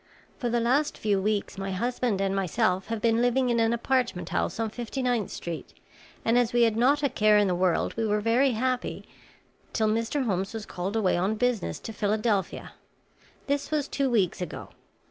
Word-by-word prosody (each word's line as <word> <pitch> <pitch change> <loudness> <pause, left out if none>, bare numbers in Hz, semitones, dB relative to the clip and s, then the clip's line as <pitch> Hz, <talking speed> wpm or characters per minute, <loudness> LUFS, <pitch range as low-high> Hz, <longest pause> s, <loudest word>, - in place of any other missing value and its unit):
For 245 -4 -1
the 240 +1 +1
last 265 +6 +1
few 205 -3 +1
weeks 205 -1 -1
my 195 0 -3
husband 240 0 -1
and 195 0 0
myself 190 0 0
have 225 -1 -3
been 230 0 +3
living 245 +1 +2
in 235 - +2
an 225 0 +3
apartment 235 -5 0
house - - -1
on 225 -1 -1
Fifty 245 +3 -4
ninth 245 -5 0
Street, 170 -2 -7 0.5
and 230 +2 +4
as 240 -1 0
we 240 0 +4
had 225 -2 +3
not 275 +6 +3
a 280 - +3
care 215 -2 +4
in 205 -1 +4
the 185 - +1
world, 180 -1 +1
we 225 -1 0
were 210 0 +1
very 240 +5 +3
happy 255 +2 -2 0.7
till 220 - +1
Mr. 230 +5 0
Holmes 195 0 -1
was 220 -1 -5
called 185 +4 -4
away 200 -6 +2
on 190 +5 0
business 245 -1 0
to 225 - -7
Philadelphia. 210 -1 -1 0.7
This 285 0 -1
was 300 -2 0
two 275 -1 0
weeks 200 -7 +1
ago. 180 - -6
225 Hz, 195 wpm, -27 LUFS, 200-245 Hz, 0.7 s, and